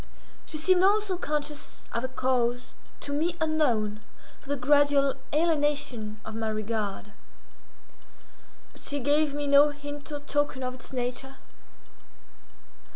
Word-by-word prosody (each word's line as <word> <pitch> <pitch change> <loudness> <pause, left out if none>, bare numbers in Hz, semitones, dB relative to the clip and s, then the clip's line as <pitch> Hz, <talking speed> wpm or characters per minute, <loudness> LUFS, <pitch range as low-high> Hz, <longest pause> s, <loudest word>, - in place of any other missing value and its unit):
She 310 - -3
seemed, 360 +4 +4
also, 405 -1 +3
conscious 300 -3 -4
of 235 - -1
a - - 0
cause, 250 -1 0 0.3
to 285 - -4
me 330 +4 0
unknown, 245 -10 +1 0.4
for 280 - -15
the 285 - +1
gradual 285 +1 +4 0.2
alienation 290 -9 0
of 220 - -6
my 220 0 -2
regard; 215 -1 -3 1.6
but - - -17
she 285 - -2
gave 290 +2 +2
me 290 0 -2
no 285 +1 +6
hint 290 +1 -8
or 290 - -3
token 290 -2 -1
of 255 0 -2
its 255 - -10
nature. 250 +1 -3
285 Hz, 130 wpm, -28 LUFS, 245-295 Hz, 1.6 s, no